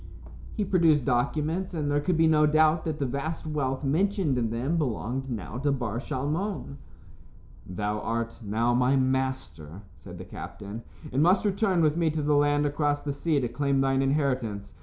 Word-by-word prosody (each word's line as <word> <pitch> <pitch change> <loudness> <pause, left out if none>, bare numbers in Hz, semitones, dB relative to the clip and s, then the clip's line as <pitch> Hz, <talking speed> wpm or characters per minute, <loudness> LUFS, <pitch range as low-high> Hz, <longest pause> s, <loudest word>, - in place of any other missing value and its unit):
He 210 - -1
produced 165 -8 +3
documents, 155 +9 0
and 150 -2 -1
there 145 - +2
could 165 +3 0
be 160 - +4
no 155 -1 +4
doubt 155 +1 +3
that 155 -2 -2
the 140 - -1
vast 140 +6 -3
wealth 140 -3 -2
mentioned 170 +1 +1
in 120 -2 0
them 125 +8 -1
belonged 135 -2 -2
now 110 0 -5
to 145 +1 +1
Bar 120 -5 -2
Shalmon. 150 +5 -3 0.9
"Thou 105 +3 -2
art 115 +2 -3
now 115 +4 +1
my 125 +2 +3
master," 130 - -2
said - - -12
the - - -8
captain, 105 +3 -8 0.3
"and 135 - +2
must 180 +6 +4
return 195 -3 +2
with 155 +1 +2
me 165 -2 +2
to 155 -1 -2
the 150 +1 +2
land 145 0 +3
across 145 0 0
the 145 - -2
sea 150 +1 0
to 125 - 0
claim 140 +3 0
thine 135 0 +2
inheritance. 130 -7 -1
140 Hz, 180 wpm, -27 LUFS, 125-155 Hz, 0.9 s, be